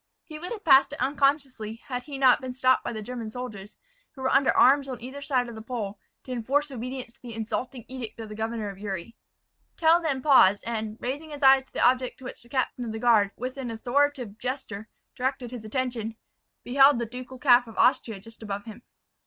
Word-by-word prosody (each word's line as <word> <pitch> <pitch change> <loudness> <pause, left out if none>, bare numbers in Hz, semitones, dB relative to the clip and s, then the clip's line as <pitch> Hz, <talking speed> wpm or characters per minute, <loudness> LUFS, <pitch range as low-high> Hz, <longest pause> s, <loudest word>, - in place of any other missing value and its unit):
He 310 -1 -9
would 355 +3 -7
have 440 -3 -6
passed 275 -1 +6
it - - -7
unconsciously 270 -4 0
had 250 +1 -6
he 275 +2 -7
not 260 -1 +5
been 255 -1 -5
stopped 255 0 +3
by - - -3
the 215 -2 -5
German 235 -1 -5
soldiers, 215 -4 -8 0.4
who 265 - -8
were 260 - +1
under 270 0 +4
arms 275 +2 +5
on 255 -2 -5
either 260 +4 -8
side 265 -3 0
the 220 - -8
pole, 215 -4 -5 0.2
to 260 - -9
enforce 275 +5 0
obedience 255 -1 -6
to - - -26
the 235 -3 -8
insulting 230 +2 -4
edict 240 -3 -7
of 225 - -6
the 215 - -8
governor 220 0 -3
of 195 -1 -10
Uri. 200 +1 -5 0.6
Tell 330 +1 +5
then 275 -6 -1
paused, 205 -9 +6
and, 220 -2 -3
raising 285 +6 -4
his 290 -1 -8
eyes 265 0 +7
to - - -27
the - - +4
object 255 0 +1
to - - -15
which - - -8
the 240 - -18
captain 255 -1 -1
of 225 -2 -4
the - - -4
guard, 220 -4 +4
with 255 +3 -5
an 260 -3 -4
authoritative 245 -1 0
gesture, 235 -4 -5 0.3
directed 255 -1 -2
his 245 -3 -7
attention, 230 -1 -3 0.5
beheld 270 +2 +5
the 235 - -1
ducal 250 +2 -9
cap 245 -2 +5
of 225 - -12
Austria 225 -4 +2
just 225 +3 -15
above 205 -2 -5
him. 220 +1 -10
250 Hz, 215 wpm, -26 LUFS, 225-270 Hz, 0.6 s, eyes